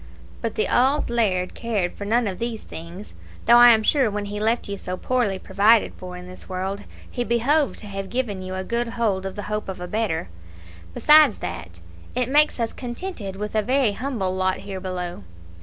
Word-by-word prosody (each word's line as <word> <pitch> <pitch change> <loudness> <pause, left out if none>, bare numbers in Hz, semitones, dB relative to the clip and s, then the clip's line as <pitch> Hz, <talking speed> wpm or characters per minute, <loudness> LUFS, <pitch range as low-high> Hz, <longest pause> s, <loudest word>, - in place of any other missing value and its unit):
But 230 -2 -3
the 215 - +1
auld 265 +2 +2
laird 190 -6 +1
cared 210 -6 -2
for 200 - -7
none 230 +3 +2
of 190 -3 -3
these 230 -2 -3
things; 170 +5 -9 0.3
though 240 - +7
I 240 0 +10
am 220 -2 +5
sure 265 -1 +3
when 205 0 -3
he 205 +1 -5
left 225 +3 0
you 200 - -3
so 185 -1 -5
poorly 240 -6 0
provided 205 +4 +3
for 180 -1 -8
in 180 - -9
this 185 +1 -10
world, 190 +2 -3 0.2
he 245 - -3
behoved 255 +5 +1
to - - -10
have 195 -1 -5
given 230 -6 -2
you 185 0 -5
a 185 - -3
good 235 +4 -1
hold 215 -5 -1
of 190 - -7
the 205 - -5
hope 210 -1 -3
of 190 - -5
a 180 - -5
better; 185 - -1 0.7
besides 300 -6 +6
that, 85 -1 -7 0.3
it 250 0 0
makes 295 -1 +3
us 230 -1 -1
contented 240 - -6
with 210 +2 -5
a 215 - +2
very 255 0 +2
humble 210 -5 -2
lot 185 0 +1
here 195 -2 -6
below. 180 - -5
210 Hz, 205 wpm, -23 LUFS, 190-240 Hz, 0.7 s, I